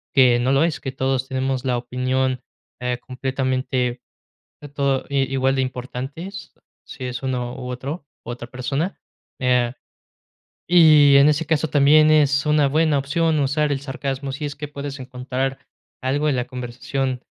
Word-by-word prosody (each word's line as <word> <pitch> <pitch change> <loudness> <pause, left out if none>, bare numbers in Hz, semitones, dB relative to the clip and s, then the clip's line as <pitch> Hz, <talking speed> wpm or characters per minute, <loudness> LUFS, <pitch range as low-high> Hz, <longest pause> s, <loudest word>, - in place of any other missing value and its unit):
que 125 -3 +6
no 130 +2 +1
lo 140 +3 +4
es, 165 -2 0
que 135 - -4
todos 130 -1 -1
tenemos 130 -1 -1
la 125 -1 +1
opinión, 130 +1 -1 0.4
eh, 125 0 -1
completamente, 130 -1 -2 0.6
que 145 - -8
todo 140 -2 -1
i 135 -1 0
igual 135 0 +2
de 130 - +2
importantes, 130 +8 -6 0.3
si 130 - -8
es 125 -1 -4
uno 125 -2 -2
u 125 -1 -6
otro, 140 +5 -5 0.2
otra 120 0 -6
persona. 135 +9 -3 0.4
Eh, 125 -1 +2 1.0
y 155 -5 +7
en 140 +2 +7
ese 150 +1 -1
caso 160 -1 +1
también 155 +2 +5
es 145 -2 +4
una 150 -2 +3
buena 155 0 +2
opción 155 +2 +1
usar 145 +2 +1
el 135 - -1
sarcasmo, 135 -1 -4
si 145 +2 -5
es 145 - -5
que 150 0 -6
puedes 140 -1 -6
encontrar 130 +1 -3 0.4
algo 145 +4 0
en 140 - +1
la 125 0 -1
conversación, 125 +1 -4
135 Hz, 160 wpm, -22 LUFS, 125-145 Hz, 1.0 s, y